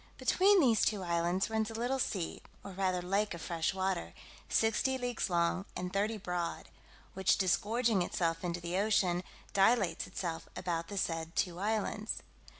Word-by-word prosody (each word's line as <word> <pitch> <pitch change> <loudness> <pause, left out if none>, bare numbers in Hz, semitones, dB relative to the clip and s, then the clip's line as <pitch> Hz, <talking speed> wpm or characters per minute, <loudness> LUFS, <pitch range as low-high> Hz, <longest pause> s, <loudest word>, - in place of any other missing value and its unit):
Between 395 +1 +4
these 235 - +4
two 205 -3 +1
islands 175 +2 +1
runs 220 0 0
a 225 - -7
little 245 +4 -1
sea, 190 -9 -2 0.2
or 200 - -7
rather 185 -1 0
lake 195 +1 0
of 170 - -9
fresh 165 -1 0
water, 190 - -2 0.3
sixty 225 +4 +2
leagues 245 -4 -2
long, 175 +2 +1
and 180 0 -4
thirty 210 +3 0
broad; 180 -4 -3 0.4
which 190 -1 +3
disgorging 215 +3 +2
itself 165 -1 -1
into 175 -1 -2
the 170 +1 -3
ocean, 190 -4 +2 0.3
dilates 195 -3 +3
itself 165 -2 -4
about 170 -2 -2
the 200 - -6
said 165 -2 -2
two 175 -1 0
islands. 215 +1 -1
190 Hz, 155 wpm, -33 LUFS, 175-220 Hz, 0.4 s, Between